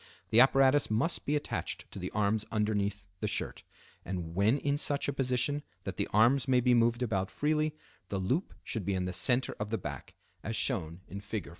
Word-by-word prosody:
The 110 Hz, -, +6 dB
apparatus 135 Hz, +2 st, +5 dB
must 115 Hz, +11 st, 0 dB
be 145 Hz, -, +2 dB
attached 145 Hz, -, -3 dB
to -, -, -7 dB
the -, -, -4 dB
arms 105 Hz, +1 st, +1 dB
underneath 105 Hz, -2 st, 0 dB
the 105 Hz, -, -1 dB
shirt, 100 Hz, -, -3 dB, 0.4 s
and 85 Hz, -3 st, -5 dB
when 100 Hz, +8 st, +3 dB
in 145 Hz, 0 st, 0 dB
such 145 Hz, -1 st, +2 dB
a 140 Hz, -, 0 dB
position 135 Hz, +2 st, 0 dB, 0.2 s
that 95 Hz, -3 st, -5 dB
the -, -, 0 dB
arms 120 Hz, +5 st, +4 dB
may 130 Hz, -1 st, +4 dB
be 125 Hz, 0 st, +3 dB
moved 120 Hz, +1 st, +3 dB
about 95 Hz, -5 st, -1 dB
freely, 155 Hz, +1 st, 0 dB, 0.3 s
the 100 Hz, -, -2 dB
loop 125 Hz, -, -1 dB
should 110 Hz, -, -3 dB
be 95 Hz, +2 st, -1 dB
in 90 Hz, -1 st, -1 dB
the 90 Hz, -, -3 dB
center 125 Hz, +7 st, +2 dB
of 105 Hz, 0 st, -3 dB
the 115 Hz, -, 0 dB
back, 75 Hz, -, -7 dB, 0.3 s
as -, -, -3 dB
shown 80 Hz, +3 st, -1 dB
in 100 Hz, -, -7 dB
Fig. 100 Hz, -2 st, -5 dB
110 Hz, 200 wpm, -31 LUFS, 100-135 Hz, 0.4 s, The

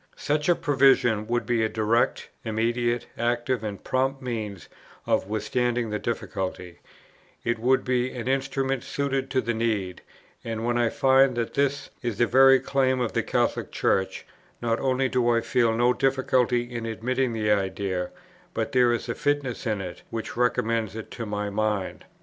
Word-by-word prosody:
Such 150 Hz, +3 st, 0 dB
a 175 Hz, -, +5 dB
provision 130 Hz, -8 st, +3 dB
would 120 Hz, +1 st, 0 dB
be 120 Hz, -2 st, +1 dB
a 110 Hz, -, +1 dB
direct, 110 Hz, +2 st, +1 dB
immediate, 120 Hz, +2 st, 0 dB
active, 120 Hz, 0 st, 0 dB
and 105 Hz, -2 st, -5 dB
prompt 135 Hz, +1 st, 0 dB
means 110 Hz, -6 st, -5 dB, 0.4 s
of -, -, +1 dB
withstanding 120 Hz, +2 st, -1 dB
the 105 Hz, -, -1 dB
difficulty; 95 Hz, -6 st, -4 dB, 0.6 s
it 120 Hz, -1 st, -1 dB
would 130 Hz, +3 st, +2 dB
be 125 Hz, -1 st, +1 dB
an 125 Hz, -1 st, -6 dB
instrument 135 Hz, -1 st, 0 dB
suited 135 Hz, -1 st, -2 dB
to 130 Hz, -1 st, +1 dB
the 115 Hz, 0 st, -1 dB
need; 105 Hz, -5 st, -1 dB, 0.4 s
and, 115 Hz, 0 st, -3 dB
when 120 Hz, 0 st, +1 dB
I 120 Hz, -1 st, +2 dB
find 135 Hz, -1 st, +4 dB
that 115 Hz, -1 st, -2 dB
this 140 Hz, 0 st, 0 dB
is 120 Hz, -4 st, -3 dB
the 120 Hz, -, +4 dB
very 135 Hz, +2 st, +6 dB
claim 130 Hz, -1 st, +1 dB
of 120 Hz, -2 st, -1 dB
the -, -, +1 dB
Catholic -, -, -1 dB
Church, 95 Hz, 0 st, 0 dB, 0.3 s
not 115 Hz, -1 st, 0 dB
only 130 Hz, 0 st, +1 dB
do 125 Hz, -2 st, +1 dB
I 115 Hz, -1 st, +4 dB
feel 115 Hz, 0 st, +2 dB
no 120 Hz, +1 st, +4 dB
difficulty 130 Hz, -2 st, +2 dB
in 120 Hz, -1 st, -5 dB
admitting 125 Hz, +3 st, -1 dB
the 105 Hz, -1 st, 0 dB
idea, 95 Hz, -2 st, -1 dB, 0.5 s
but -, -, -1 dB
there 125 Hz, -2 st, +4 dB
is 120 Hz, 0 st, -2 dB
a 115 Hz, -, -1 dB
fitness 140 Hz, -4 st, -1 dB
in 105 Hz, -3 st, -1 dB
it, 90 Hz, -2 st, -7 dB
which 115 Hz, -1 st, -5 dB
recommends 115 Hz, -3 st, 0 dB
it 110 Hz, -, -7 dB
to 115 Hz, -2 st, -5 dB
my 105 Hz, 0 st, -3 dB
mind. 105 Hz, -2 st, -2 dB
120 Hz, 170 wpm, -26 LUFS, 110-130 Hz, 0.6 s, very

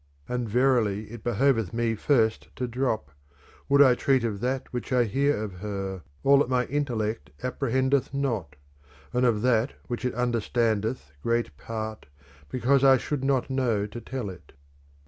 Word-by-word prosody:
And 125 Hz, -2 st, -2 dB
verily 110 Hz, -4 st, +2 dB
it 120 Hz, -2 st, -9 dB
behoveth 120 Hz, -4 st, +1 dB
me 115 Hz, -1 st, +1 dB
first 110 Hz, -1 st, +1 dB
to 125 Hz, -, -2 dB
drop, 115 Hz, -, -1 dB, 0.6 s
Would 140 Hz, +1 st, +7 dB
I 130 Hz, -2 st, +6 dB
treat 130 Hz, 0 st, +2 dB
of 110 Hz, -4 st, -2 dB
that 130 Hz, +3 st, -2 dB
which 125 Hz, +1 st, -4 dB
I 125 Hz, -1 st, +4 dB
hear 140 Hz, +6 st, +1 dB
of 95 Hz, -4 st, -7 dB
her, 95 Hz, -2 st, -4 dB, 0.2 s
all 140 Hz, 0 st, +6 dB
that 140 Hz, -, +1 dB
my 125 Hz, -1 st, +2 dB
intellect 115 Hz, -, -2 dB
apprehendeth 130 Hz, +1 st, +1 dB
not: 115 Hz, -, -2 dB, 0.6 s
and 125 Hz, 0 st, +3 dB
of 110 Hz, -2 st, +1 dB
that 125 Hz, +1 st, +2 dB
which 120 Hz, 0 st, -4 dB
it 125 Hz, -2 st, -1 dB
understandeth 115 Hz, -, 0 dB
great 115 Hz, -8 st, 0 dB
part, 110 Hz, +4 st, -6 dB, 0.4 s
because 130 Hz, +2 st, +2 dB
I 135 Hz, -1 st, +7 dB
should 135 Hz, +2 st, -3 dB
not 135 Hz, -1 st, +1 dB
know 120 Hz, -6 st, +1 dB
to 110 Hz, +3 st, -8 dB
tell 125 Hz, -7 st, -4 dB
it. 90 Hz, -, -15 dB
120 Hz, 160 wpm, -27 LUFS, 110-130 Hz, 0.6 s, Would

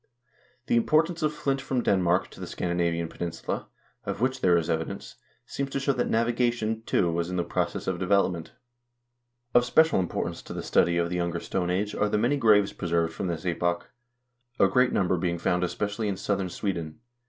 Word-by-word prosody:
The 120 Hz, -, +2 dB
importation 160 Hz, +7 st, +2 dB
of 155 Hz, -, +2 dB
flint 135 Hz, -2 st, -1 dB
from 130 Hz, -3 st, -1 dB
Denmark 90 Hz, -2 st, +2 dB
to -, -, -13 dB
the -, -, -6 dB
Scandinavian 85 Hz, -1 st, -1 dB
peninsula, 85 Hz, 0 st, -4 dB, 0.4 s
of -, -, -4 dB
which 130 Hz, +2 st, 0 dB
there 90 Hz, -2 st, +5 dB
is 85 Hz, -, -1 dB
evidence, 80 Hz, 0 st, -3 dB, 0.3 s
seems 140 Hz, 0 st, -3 dB
to 135 Hz, -, -2 dB
show 135 Hz, 0 st, +1 dB
that 125 Hz, -, -1 dB
navigation, 115 Hz, -1 st, +1 dB
too, 85 Hz, -2 st, +2 dB
was 85 Hz, +1 st, -1 dB
in 90 Hz, -, -3 dB
the 90 Hz, -, +1 dB
process -, -, -2 dB
of 95 Hz, -2 st, -2 dB
development. 90 Hz, -3 st, +1 dB, 1.0 s
Of 120 Hz, -, +6 dB
special 160 Hz, +4 st, +4 dB
importance 90 Hz, -, -2 dB
to -, -, -9 dB
the -, -, -5 dB
study 85 Hz, 0 st, +3 dB
of 85 Hz, 0 st, 0 dB
the 90 Hz, -, -1 dB
Younger 85 Hz, -1 st, -1 dB
Stone 90 Hz, +1 st, -2 dB
Age 100 Hz, +4 st, -1 dB
are 105 Hz, -, +1 dB
the 105 Hz, -, +1 dB
many 125 Hz, +7 st, +2 dB
graves 105 Hz, -5 st, +4 dB
preserved 85 Hz, -2 st, 0 dB
from 95 Hz, -, -3 dB
this 85 Hz, 0 st, -4 dB
epoch, 85 Hz, +3 st, -1 dB, 0.7 s
a -, -, +6 dB
great 125 Hz, -1 st, +3 dB
number 90 Hz, -1 st, +1 dB
being 85 Hz, 0 st, -1 dB
found 90 Hz, +1 st, 0 dB
especially 105 Hz, +4 st, -2 dB
in 100 Hz, -2 st, -2 dB
southern 95 Hz, -2 st, -1 dB
Sweden. 85 Hz, -5 st, -4 dB
95 Hz, 190 wpm, -27 LUFS, 85-120 Hz, 1.0 s, Of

